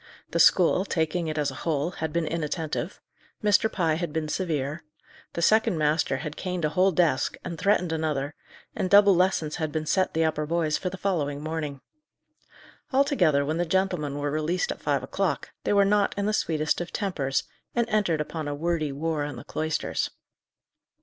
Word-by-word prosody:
The - - 0
school, 185 0 +5
taking 165 -2 -1
it 155 0 -3
as 145 -2 0
a 130 - -9
whole, 160 0 0
had 160 -3 -4
been 170 +1 0
inattentive; 160 +2 -3 0.4
Mr. 210 +1 +3
Pye 165 -4 +1
had 170 -3 -2
been 160 0 -2
severe; 155 -3 -2 0.5
the 170 - -2
second 220 -1 +4
master 150 -2 +1
had 150 +3 -5
caned 180 -3 -2
a - - +1
whole 185 +4 +3
desk, 165 -6 +1
and 175 -2 -5
threatened 180 -2 +1
another, 155 -3 -1 0.4
and 185 - -1
double 200 0 +7
lessons 175 -4 +1
had 155 -3 -2
been 155 +1 -2
set 185 +3 +1
the 160 0 +3
upper 155 -1 -1
boys 160 -2 +1
for 185 - -2
the 190 - -7
following 155 -7 -1
morning. 150 -3 -4 1.1
Altogether, 210 - +3
when 155 +3 -1
the 175 - +1
gentlemen 175 -5 0
were 145 0 -2
released 155 +4 0
at - - -7
five - - 0
o'clock, - - -2
they - - +2
were 200 -1 +5
not 205 0 +2
in 200 - 0
the 215 - +1
sweetest 155 -5 0
of 175 - -5
tempers, 145 -10 -1 0.3
and 235 -1 +2
entered 205 -8 +1
upon 155 0 -4
a 145 - -2
wordy 160 -1 -1
war 155 +1 -2
in 145 0 -4
the - - -9
cloisters. 155 +1 -2
160 Hz, 185 wpm, -26 LUFS, 150-185 Hz, 1.1 s, double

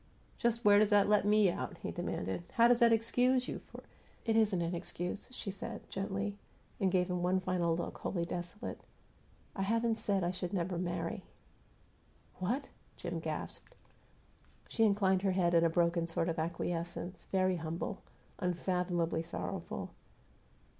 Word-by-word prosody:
"Just 235 0 +1
where 205 0 +8
does 210 -1 +4
that 205 -2 +5
let 210 -1 +4
me 210 -2 +5
out?" - - -5
he - - -5
demanded. 95 - -3
"How 235 0 +6
does 240 0 +5
that 235 -2 +6
excuse 245 +3 +3
you - - -4
for - - -12 0.2
" - - -30
"It 225 - +2
isn't 215 -5 +3
an 170 +1 -2
excuse," 175 +2 -4
she 215 -5 -5
said, 195 - -7
gently, 200 +1 -3 0.4
and 190 -2 +2
gave 180 -1 +2
him 180 -1 -1
one 180 +1 +2
final 175 -3 +1
look, 175 - -4
wholly 170 -3 -1
desolate. 175 +3 -5 0.7
"I 195 - -2
haven't 225 +3 +1
said 200 -3 +1
I 175 - +1
should 180 0 -4
never 180 -1 -1
marry." 175 -1 -2 1.2
"What?" 235 +10 -1 0.3
Jim - - -4
gasped. - - -6 0.9
She 225 - +2
inclined 195 -3 +3
her 195 -1 +2
head 175 -2 +2
in 170 -1 +5
a 165 - +4
broken 170 0 +2
sort 165 0 +1
of 165 0 -2
acquiescence, 170 +2 -3
very 185 -1 +1
humble, 165 +1 -4 0.4
unfathomably 175 -2 0
sorrowful. 165 +1 -5
185 Hz, 160 wpm, -33 LUFS, 175-210 Hz, 1.2 s, where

